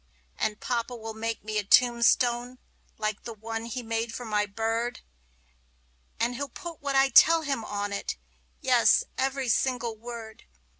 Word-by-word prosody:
And 210 Hz, -1 st, -1 dB
papa 240 Hz, 0 st, -2 dB
will 225 Hz, -1 st, -7 dB
make 225 Hz, 0 st, -4 dB
me 215 Hz, 0 st, -1 dB
a -, -, -2 dB
tombstone, 240 Hz, +2 st, +3 dB, 0.4 s
like 215 Hz, -1 st, -2 dB
the 230 Hz, -1 st, -7 dB
one 225 Hz, +1 st, -5 dB
he 240 Hz, +2 st, -5 dB
made 225 Hz, 0 st, -2 dB
for 245 Hz, -, -6 dB
my 210 Hz, -1 st, 0 dB
bird; 225 Hz, +3 st, -2 dB, 1.2 s
And 235 Hz, +2 st, +1 dB
he'll 280 Hz, +3 st, -4 dB
put 340 Hz, -3 st, -9 dB
what 280 Hz, -1 st, -2 dB
I 270 Hz, 0 st, +5 dB
tell 325 Hz, +3 st, +7 dB
him 275 Hz, -6 st, -2 dB
on 205 Hz, -1 st, -3 dB
it 200 Hz, -, -3 dB, 0.4 s
yes, -, -, +4 dB, 0.2 s
every 270 Hz, 0 st, 0 dB
single 240 Hz, -1 st, 0 dB
word! 225 Hz, -1 st, -9 dB
235 Hz, 155 wpm, -27 LUFS, 220-250 Hz, 1.2 s, tell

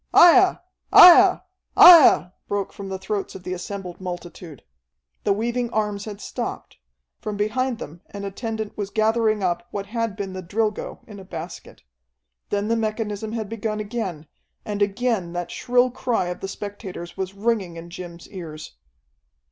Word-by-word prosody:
"Aiah! 365 Hz, +2 st, +7 dB, 0.3 s
Aiah! 360 Hz, +1 st, +9 dB, 0.4 s
Aiah!" 315 Hz, -, +9 dB, 0.2 s
broke 200 Hz, -1 st, -3 dB
from 195 Hz, -1 st, -8 dB
the 190 Hz, -, -3 dB
throats 195 Hz, +1 st, -4 dB
of 190 Hz, -, -9 dB
the 185 Hz, -, -4 dB
assembled 185 Hz, 0 st, -7 dB
multitude. 175 Hz, -4 st, -8 dB, 0.6 s
The 205 Hz, -, +3 dB
weaving 235 Hz, +4 st, -1 dB
arms 210 Hz, -3 st, -2 dB
had 205 Hz, -2 st, -7 dB
stopped. -, -, -6 dB, 0.4 s
From 210 Hz, -1 st, -5 dB
behind 235 Hz, +4 st, -1 dB
them 165 Hz, -3 st, -9 dB
an 200 Hz, -1 st, -7 dB
attendant 220 Hz, +1 st, -5 dB
was 205 Hz, -2 st, -4 dB
gathering 220 Hz, -1 st, +1 dB
up 180 Hz, +6 st, -1 dB
what 200 Hz, -4 st, -5 dB
had 230 Hz, -1 st, -3 dB
been 200 Hz, -2 st, -5 dB
the 185 Hz, -, -5 dB
Drilgo 210 Hz, +4 st, -3 dB
in 210 Hz, -2 st, -11 dB
a -, -, -10 dB
basket. 170 Hz, -4 st, -9 dB, 0.7 s
Then 205 Hz, 0 st, -1 dB
the 230 Hz, -, +1 dB
mechanism 215 Hz, -1 st, -3 dB
had 220 Hz, -2 st, -3 dB
begun 215 Hz, 0 st, -3 dB
again, 205 Hz, -8 st, -4 dB, 0.4 s
and 205 Hz, -1 st, -4 dB
again 205 Hz, -3 st, 0 dB
that 175 Hz, 0 st, -4 dB
shrill 245 Hz, +1 st, +2 dB
cry 235 Hz, -7 st, -1 dB
of 180 Hz, -, -5 dB
the 195 Hz, -, -5 dB
spectators 195 Hz, -3 st, -7 dB
was 190 Hz, 0 st, -5 dB
ringing 200 Hz, -5 st, -1 dB
in 170 Hz, +1 st, -10 dB
Jim's 175 Hz, -1 st, -9 dB
ears. 155 Hz, -, -9 dB
205 Hz, 155 wpm, -23 LUFS, 185-225 Hz, 0.7 s, Aiah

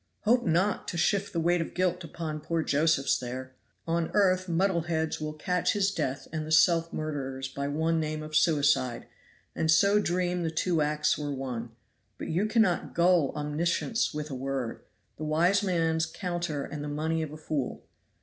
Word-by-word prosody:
"Hope 240 Hz, +3 st, +3 dB
not 180 Hz, +5 st, +1 dB
to 170 Hz, -, -3 dB
shift 200 Hz, +4 st, +1 dB
the 170 Hz, -, -1 dB
weight 175 Hz, +1 st, +2 dB
of 165 Hz, -, -6 dB
guilt 180 Hz, 0 st, 0 dB
upon 160 Hz, -1 st, -5 dB
poor 165 Hz, +1 st, -1 dB
Josephs 145 Hz, -1 st, +2 dB
there. 130 Hz, +1 st, -6 dB, 0.3 s
On 165 Hz, 0 st, 0 dB
earth 185 Hz, -2 st, +3 dB
muddle 175 Hz, +1 st, +2 dB
heads 160 Hz, -2 st, -2 dB
will 155 Hz, 0 st, -3 dB
call 180 Hz, +4 st, -1 dB
his 195 Hz, +2 st, +2 dB
death 140 Hz, -5 st, -3 dB
and 155 Hz, -1 st, -2 dB
the 155 Hz, -, -7 dB
self 165 Hz, +1 st, +4 dB
murderer's 135 Hz, -4 st, -4 dB
by 140 Hz, +1 st, -4 dB
one 160 Hz, +3 st, 0 dB
name 155 Hz, 0 st, -3 dB
of 155 Hz, 0 st, -6 dB
'suicide,' 140 Hz, -6 st, +2 dB, 0.5 s
and 160 Hz, -, 0 dB
so 200 Hz, +6 st, +5 dB
dream 180 Hz, -1 st, 0 dB
the 165 Hz, -, 0 dB
two 160 Hz, 0 st, 0 dB
acts 150 Hz, 0 st, +1 dB
were 145 Hz, -1 st, -3 dB
one; 125 Hz, -4 st, -4 dB, 0.5 s
but -, -, -6 dB
you 185 Hz, +6 st, +1 dB
cannot 215 Hz, -6 st, +1 dB
gull 170 Hz, -4 st, +4 dB
Omniscience 165 Hz, +10 st, 0 dB
with 150 Hz, -1 st, -5 dB
a -, -, -4 dB
word 130 Hz, -2 st, -3 dB, 0.4 s
the 155 Hz, -, -6 dB
wise 170 Hz, +6 st, +3 dB
man's 165 Hz, -4 st, +1 dB
counter 175 Hz, -4 st, -3 dB
and 145 Hz, 0 st, -6 dB
the -, -, -4 dB
money 160 Hz, +2 st, -1 dB
of 155 Hz, -2 st, -4 dB
a 155 Hz, -, -8 dB
fool. 150 Hz, -4 st, -3 dB
160 Hz, 180 wpm, -28 LUFS, 150-175 Hz, 0.5 s, so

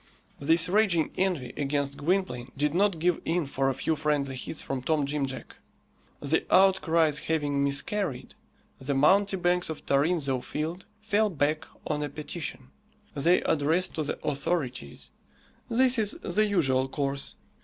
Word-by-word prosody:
This 165 Hz, +4 st, +3 dB
raging 185 Hz, -4 st, +2 dB
envy 175 Hz, -10 st, -1 dB
against 140 Hz, -1 st, -1 dB
Gwynplaine 145 Hz, -7 st, -1 dB
did 150 Hz, +1 st, +1 dB
not 195 Hz, 0 st, +2 dB
give 175 Hz, +1 st, +1 dB
in 170 Hz, 0 st, 0 dB
for 135 Hz, 0 st, 0 dB
a 135 Hz, -, -1 dB
few 160 Hz, +4 st, 0 dB
friendly 145 Hz, -3 st, -1 dB
hits 130 Hz, +4 st, -6 dB
from 135 Hz, -2 st, -4 dB
Tom 150 Hz, +2 st, +1 dB
Jim 140 Hz, -1 st, -1 dB
Jack. 130 Hz, -, -9 dB, 0.6 s
The 145 Hz, +3 st, 0 dB
outcries 170 Hz, -5 st, +4 dB
having 145 Hz, -3 st, 0 dB
miscarried, 140 Hz, +2 st, -1 dB, 0.5 s
the 135 Hz, +1 st, -2 dB
mountebanks 180 Hz, +3 st, +3 dB
of 160 Hz, -, -7 dB
Tarrinzeau 140 Hz, -2 st, +1 dB
Field 160 Hz, +7 st, -5 dB, 0.2 s
fell 215 Hz, 0 st, +2 dB
back 155 Hz, -1 st, -1 dB, 0.2 s
on 150 Hz, -1 st, -2 dB
a 145 Hz, -, -2 dB
petition. 150 Hz, -3 st, -6 dB, 0.4 s
They 165 Hz, +5 st, +3 dB
addressed 160 Hz, +5 st, +1 dB
to 160 Hz, -, -2 dB
the 145 Hz, -, -3 dB
authorities. 135 Hz, -, -3 dB, 0.6 s
This 250 Hz, +1 st, +4 dB
is 210 Hz, -2 st, +1 dB
the 215 Hz, 0 st, +1 dB
usual 135 Hz, -10 st, +2 dB
course. 140 Hz, 0 st, -3 dB
155 Hz, 145 wpm, -27 LUFS, 140-180 Hz, 0.6 s, outcries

